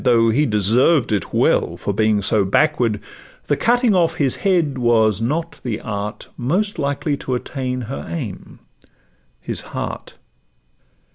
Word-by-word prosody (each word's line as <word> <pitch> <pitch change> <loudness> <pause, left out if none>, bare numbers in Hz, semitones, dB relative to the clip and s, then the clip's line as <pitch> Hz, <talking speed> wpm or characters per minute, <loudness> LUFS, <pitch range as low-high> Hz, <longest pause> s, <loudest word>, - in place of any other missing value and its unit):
Though 115 -2 +4
he 145 +6 +2
deserved 115 - +3
it 105 -4 -1
well - - +1
for 100 - -3
being 105 0 +2
so 105 +1 +3
backward, 120 0 +1 0.5
The - - +1
cutting 240 -1 +2
off 165 -3 +2
his 135 -5 +1
head 170 -9 +1
was 110 -3 +3
not 160 +8 -2
the 115 -4 -3
art 105 0 -5
Most 180 - -1
likely 145 +1 -1
to 130 - -3
attain 125 0 -3
her 125 +4 -6
aim—his 95 - -9
heart. - - -6
125 Hz, 135 wpm, -20 LUFS, 110-150 Hz, 0.5 s, Though